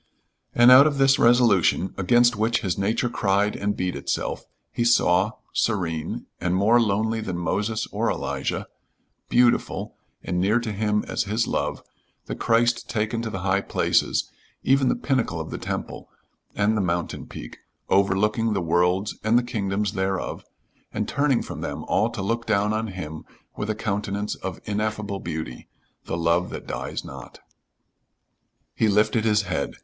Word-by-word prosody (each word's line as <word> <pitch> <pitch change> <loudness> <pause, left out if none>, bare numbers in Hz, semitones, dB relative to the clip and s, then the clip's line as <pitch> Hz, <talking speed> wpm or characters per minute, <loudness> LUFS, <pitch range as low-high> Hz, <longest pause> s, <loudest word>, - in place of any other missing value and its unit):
And 120 +1 +7
out 135 +3 +9
of 145 -2 -1
this 135 0 +4
resolution, 115 -6 +4
against 120 +5 +4
which 110 +2 +1
his 95 -7 -1
nature 105 +5 0
cried 100 -2 +1
and 105 0 -2
beat 90 -3 -2
itself, 70 - -3 0.3
he 120 - -1
saw, 105 -3 +3 0.2
serene, 85 -8 -1
and 90 0 0
more 110 +5 +4
lonely 110 +1 0
than 95 -5 -4
Moses 105 +6 -1
or - - 0
Elijah, - - -2 0.6
beautiful, 120 0 +2 0.3
and 90 0 -2
near 105 +5 +3
to 115 -2 -4
him 105 0 0
as - - -1
his 110 +3 0
love, - - -2 0.4
the - - -5
Christ 120 +1 +1
taken 110 +1 -1
to 115 - -3
the 95 -4 -5
high 100 +1 +1
places, - - +1 0.4
even 135 -1 +3
the - - +2
pinnacle 125 - -1
of 80 - -6
the - - -5
temple - - -5 0.5
and 105 +2 +2
the 105 - +1
mountain 85 -2 -2
peak, - - -9 0.3
overlooking 105 +4 +2
the 100 - 0
worlds 90 +4 +1
and 110 +2 +3
the 120 - +2
kingdoms 105 -4 -1
thereof, 95 0 -2 0.5
and - - -2
turning 140 -3 +1
from - - -7
them - - -4
all - - +1
to 95 - -5
look 115 +4 -2
down 105 -1 +2
on 110 +1 -1
him 85 -6 -7 0.3
with 105 - -4
a 110 - 0
countenance 105 -1 -2
of 95 -3 -6
ineffable 105 -1 -2
beauty 80 -8 -6 0.4
the - - -3
love 85 +2 +1
that - - -7
dies - - -5
not. - - -10 1.3
He 110 - +1
lifted 105 +2 +2
his 105 -1 +3
head. 90 -7 -3
105 Hz, 160 wpm, -24 LUFS, 95-115 Hz, 1.3 s, out